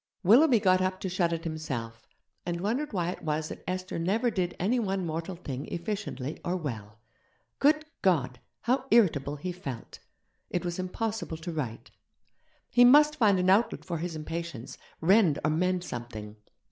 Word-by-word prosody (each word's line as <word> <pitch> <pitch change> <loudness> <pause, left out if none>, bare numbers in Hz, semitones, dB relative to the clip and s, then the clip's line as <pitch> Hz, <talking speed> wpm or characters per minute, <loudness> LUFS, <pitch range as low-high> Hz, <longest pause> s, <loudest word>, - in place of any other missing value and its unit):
Willoughby 240 - +6
got 185 -2 +3
up 185 0 -1
to 190 - -2
shut 175 -1 +1
it 165 0 -3
himself, 130 -9 -5 0.4
and 175 -1 -3
wondered 240 +11 -1
why 175 -4 -1
it - - -9
was 155 0 -2
that - - -8
Esther 185 -1 -3
never 215 +8 +1
did 180 -4 -1
any 225 +8 +1
one 195 -4 -1
mortal 165 +3 -4
thing 140 -5 -6
efficiently 170 -7 -4
or 180 +1 -1
well. 110 - -6 0.6
Good 305 +2 +3 0.2
God! 135 -10 +1 0.2
how 255 +2 +1
irritable 155 - +3
he 180 +5 -4
felt. 140 -10 -7 0.5
It 180 0 -2
was 175 +1 -3
impossible 200 -1 -3
to 165 +2 -6
write. 130 -8 -5 0.8
He 245 - +6
must 295 +4 +7
find 210 -6 +4
an 185 0 +3
outlet 215 +5 +2
for 170 -3 -3
his 170 0 -4
impatience, 155 -5 -5 0.3
rend 185 -4 +5
or 155 - +2
mend 180 +3 +1
something. 110 -6 -7
175 Hz, 165 wpm, -28 LUFS, 155-200 Hz, 0.8 s, must